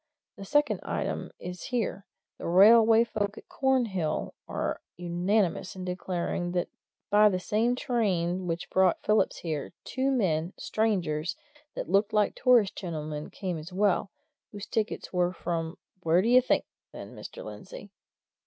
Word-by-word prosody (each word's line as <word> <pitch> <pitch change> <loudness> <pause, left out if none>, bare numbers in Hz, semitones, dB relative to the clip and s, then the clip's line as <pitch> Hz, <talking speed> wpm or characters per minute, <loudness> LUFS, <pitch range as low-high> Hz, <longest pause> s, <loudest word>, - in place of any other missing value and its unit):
The 195 - -9
second 295 +8 +2
item - - -3
is 180 -1 -7
here 220 -5 -2 0.3
the - - -5
railway 220 +5 +7
folk 210 -2 -3
at - - -12
Cornhill 225 - 0
are - - -3 0.2
unanimous 180 +2 0
in 185 -1 -6
declaring 180 -1 -2
that 175 -1 -1 0.4
by 210 +1 +7
that 185 -2 -1
same 225 +6 +1
train 190 - 0
which 165 0 -3
brought 185 -2 +3
Phillips 215 0 +1
there, 155 -2 -3
two 265 +1 -1
men, 180 - 0
strangers, 180 -8 -1 0.4
that - - -4
looked 200 +4 +2
like 210 -1 +3
tourist 245 -6 +4
gentlemen, 155 -4 -5
came 180 -5 -4
as 155 +4 -9
well, 195 0 +1 0.4
whose 205 0 -7
tickets 215 -2 -3
were 180 -1 +2
from 165 -1 -3 0.2
where 170 +2 +3
d'ye 245 +3 +6
think, 255 - +1 0.3
then, - - -9
Mr. - - -9
Lindsey?" - - -10
190 Hz, 145 wpm, -28 LUFS, 175-220 Hz, 0.4 s, railway